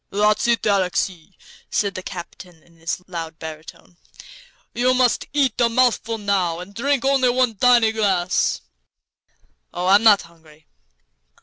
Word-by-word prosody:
"That's 210 +3 +1
it, 235 -1 +1
Alexey," 185 -2 -1 0.3
said 200 -1 -1
the 185 - -6
captain, 175 -2 -10
in 170 -1 -25
his 165 +2 -5
loud 165 -3 -7
baritone. 160 +2 -11 0.8
"You 250 +2 +1
must 250 -2 +2
just - - -11
eat 270 -5 0
a 235 - +3
mouthful, 230 -2 +1
now, 195 -5 -1
and 180 +3 -10
drink 270 +4 -1
only 270 -2 +3
one 250 -1 +1
tiny 235 0 +4
glass." 190 - 0 1.1
"Oh, 180 - -4
I'm 195 +3 +5
not 215 -3 +5
hungry." 160 -2 -20
200 Hz, 140 wpm, -21 LUFS, 175-235 Hz, 1.1 s, I'm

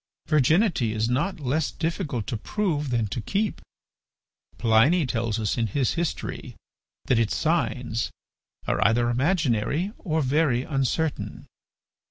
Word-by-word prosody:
Virginity 155 - +3
is 110 +1 0
not 155 +9 0
less 145 +3 0
difficult 160 - -3
to 115 - -3
prove 150 - -1
than 120 -3 +1
to 115 +4 -4
keep. 205 - -1 1.0
Pliny 125 +9 +4
tells 115 -3 -1
us 110 +2 -1
in 115 - +1
his 130 +5 0
history 170 -1 -3 0.5
that 120 - +3
its 110 -2 +1
signs 130 -8 0 0.6
are - - +1
either 120 +2 +3
imaginary 145 - +1
or 160 -4 0
very 130 -2 +2
uncertain. 145 +2 -2
135 Hz, 125 wpm, -25 LUFS, 115-160 Hz, 1.0 s, Pliny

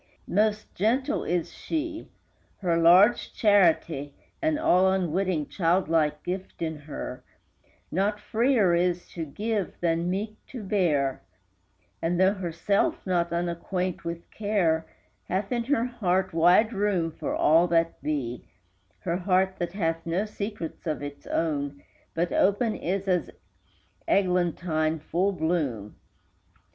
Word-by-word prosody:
Most 210 +2 0
gentle 235 +7 +1
is 175 0 -1
she; 320 0 -4 0.5
her 175 -3 +1
large 180 +7 +5
charity 165 -8 +3 0.3
(An 315 -2 +1
all 190 - +4
unwitting, 185 -3 0
child 175 -1 +1
like 150 -2 +1
gift 185 +1 -5
in 160 -1 -2
her) 145 -4 -7 0.7
Not 205 +4 0
freer 225 -5 +2
is 175 0 +1
to 165 -2 -5
give 210 +5 -3
than 170 0 0
meek 210 +3 -3
to 245 -5 -8
bear; 160 -10 +1 0.8
And, 170 +1 0
though 190 +1 +5
herself 185 +1 -1
not 175 -2 +1
unacquaint 175 +1 -2
with 170 0 -5
care, 175 -7 0 0.4
Hath 195 +2 -2
in 235 -1 0
her 245 -3 +1
heart 190 -7 0
wide 180 +8 +4
room 195 -5 0
for - - -4
all 165 +3 +4
that 165 -1 +1
be, 125 -6 -3 0.6
Her 170 -1 -1
heart 190 +1 +1
that 175 0 -3
hath 165 -4 -2
no 180 +5 0
secrets 205 -6 -6
of 155 -2 -2
its 145 0 -8
own, 145 -3 -2 0.3
But 170 +1 0
open 215 +3 +2
is 195 +3 -2
as 180 -2 +1 0.8
eglantine 170 -4 +1
full 175 +5 0
blown. 145 - -1
180 Hz, 130 wpm, -27 LUFS, 165-200 Hz, 0.8 s, large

